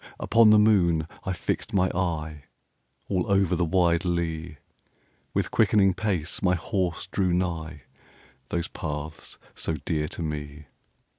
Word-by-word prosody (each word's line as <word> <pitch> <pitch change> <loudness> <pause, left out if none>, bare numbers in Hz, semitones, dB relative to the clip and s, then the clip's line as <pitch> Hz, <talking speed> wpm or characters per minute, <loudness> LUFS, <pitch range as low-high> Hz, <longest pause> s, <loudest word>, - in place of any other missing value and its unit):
Upon 115 -1 +5
the 105 - +7
moon 90 -7 +3 0.2
I 95 - -1
fixed 100 +5 -3
my 95 -1 +4
eye, 80 -5 -3 0.6
All 95 0 -1
over 95 -2 +3
the 90 - +1
wide 85 0 +2
lea; 85 -2 -2
10 - - -20 0.8
With - - 0
quickening 95 -3 +4
pace 90 -5 -2
my 90 -1 +3
horse 90 0 -2
drew 95 -1 0
nigh 80 -5 -3 0.7
Those 85 0 -1
paths 75 -1 -6 0.2
so 80 - -3
dear 75 -1 0
to 85 - -5
me. 75 -1 -5
85 Hz, 140 wpm, -26 LUFS, 80-95 Hz, 0.8 s, the